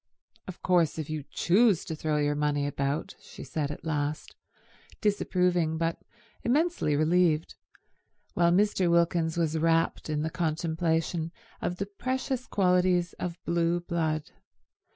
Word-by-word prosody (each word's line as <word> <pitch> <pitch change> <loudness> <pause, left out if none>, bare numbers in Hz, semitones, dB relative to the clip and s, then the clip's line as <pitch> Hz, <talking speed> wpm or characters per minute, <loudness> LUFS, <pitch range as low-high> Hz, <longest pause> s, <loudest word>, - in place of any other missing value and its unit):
"Of 185 - -9
course 175 -4 +2
if 155 -1 -4
you 155 -3 -4
choose 200 0 +3
to 160 - -4
throw 155 -1 -1
your 145 0 +1
money 145 -1 0
about—" 140 +1 -2
she - - -11
said 145 +2 -3
at 150 - -8
last, 150 -1 -2 0.7
disapproving 180 -5 +1
but 165 0 -1 0.4
immensely 295 - +1
relieved, 160 +1 +2 0.8
while 170 0 +3
Mr. 190 -1 +2
Wilkins 170 -1 +2
was 160 -1 0
rapt 165 0 +1
in 150 -1 -1
the 160 - -2
contemplation 165 0 -1 0.3
of 175 - -1
the 195 - -3
precious 255 +4 -3
qualities 180 -2 +2
of 175 -1 -4
blue 170 0 +1
blood. 160 -3 -2
165 Hz, 130 wpm, -28 LUFS, 155-180 Hz, 0.8 s, choose